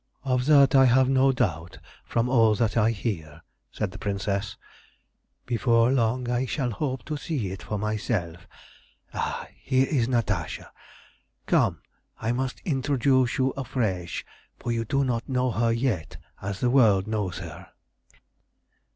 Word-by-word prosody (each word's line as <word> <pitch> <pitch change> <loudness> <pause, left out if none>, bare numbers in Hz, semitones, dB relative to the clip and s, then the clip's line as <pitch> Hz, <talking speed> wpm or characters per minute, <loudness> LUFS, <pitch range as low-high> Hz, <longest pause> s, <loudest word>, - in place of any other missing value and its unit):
"Of 125 -1 0
that 140 -3 +6
I 135 -1 +7
have 130 +1 +4
no 135 0 +4
doubt, 90 - -2 0.3
from 115 +1 0
all 115 -4 +4
that 110 0 0
I 110 -1 +4
hear," 85 -9 -4 0.3
said - - -3
the - - -10
Princess. 100 0 -2 0.9
"Before 115 0 +3
long 125 -1 +1
I 125 +2 0
shall 125 -2 -1
hope 130 +3 -3
to 155 -1 -3
see 140 - -3
it 95 -2 -7
for 105 - -4
myself. 100 -5 -3 0.7
Ah, - - -3
here 130 0 +1
is 125 -7 +1
Natasha. 120 -4 -2 0.7
Come, - - +2 0.4
I 115 +1 -2
must 130 +1 -3
introduce 135 -3 +1
you 130 0 +2
afresh, 110 -10 -3 0.3
for 120 - -4
you 115 -1 -1
do 135 +5 +1
not 120 -2 -2
know 130 -1 +1
her 115 +2 +1
yet 115 - -1 0.2
as 100 -1 -5
the 125 - +2
world 110 -8 +4
knows 105 -5 -2
her." - - -9
120 Hz, 145 wpm, -26 LUFS, 105-130 Hz, 0.9 s, I